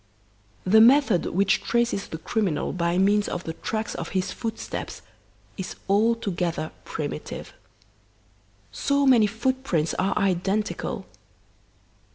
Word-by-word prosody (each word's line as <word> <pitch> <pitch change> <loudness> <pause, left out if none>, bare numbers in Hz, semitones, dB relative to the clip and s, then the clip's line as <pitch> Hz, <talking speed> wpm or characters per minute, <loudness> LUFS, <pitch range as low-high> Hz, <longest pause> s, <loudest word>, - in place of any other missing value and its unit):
"The 220 +4 +6
method 245 -5 +5
which 195 +2 +2
traces 235 -4 0
the 160 - -6
criminal 185 0 -1
by 170 0 0
means 205 +2 +3
of 175 - -4
the 160 - -4
tracks 220 +6 -3
of - - -5
his 185 - -1
footsteps 225 -2 -5 0.5
is 190 -2 -5
altogether 195 -6 0
primitive. - - -5 1.2
So 280 0 +1
many 240 -5 +6
footprints 220 - -1
are 195 +2 +1
identical. 195 +1 -1
205 Hz, 110 wpm, -25 LUFS, 180-230 Hz, 1.2 s, The